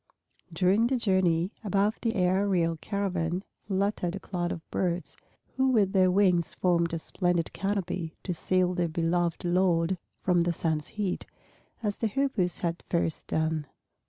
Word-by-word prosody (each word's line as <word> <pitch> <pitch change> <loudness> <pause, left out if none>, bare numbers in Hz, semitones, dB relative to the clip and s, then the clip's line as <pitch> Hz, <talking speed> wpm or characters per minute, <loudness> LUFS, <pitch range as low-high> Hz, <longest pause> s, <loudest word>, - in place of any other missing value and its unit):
During 190 +7 +3
the 260 +1 +1
journey, 185 -5 +2
above 205 +1 +1
the 230 -1 0
aerial 180 -2 +2
caravan 185 -2 -2 0.2
fluttered 195 -2 0
a - - -5
cloud 175 -3 -3
of 165 - -6
birds, 180 -1 -1 0.4
who 265 0 +3
with 210 -7 +3
their 185 -2 +5
wings 180 -3 +2
formed 170 -2 +2
a - - -1
splendid 175 0 -1
canopy 185 -4 -2
to 180 - -2
shield 180 +1 +1
their 175 -1 +2
beloved 170 +1 0
lord 175 0 +2 0.2
from 180 -2 +3
the 170 0 +1
sun's 155 -2 -1
heat, 205 -4 -3 0.6
as 205 -2 -1
the 225 - 0
Hoopoes 215 -7 0
had 170 -1 -2
first 170 -2 -1
done. 160 -2 0
180 Hz, 150 wpm, -28 LUFS, 170-195 Hz, 0.6 s, their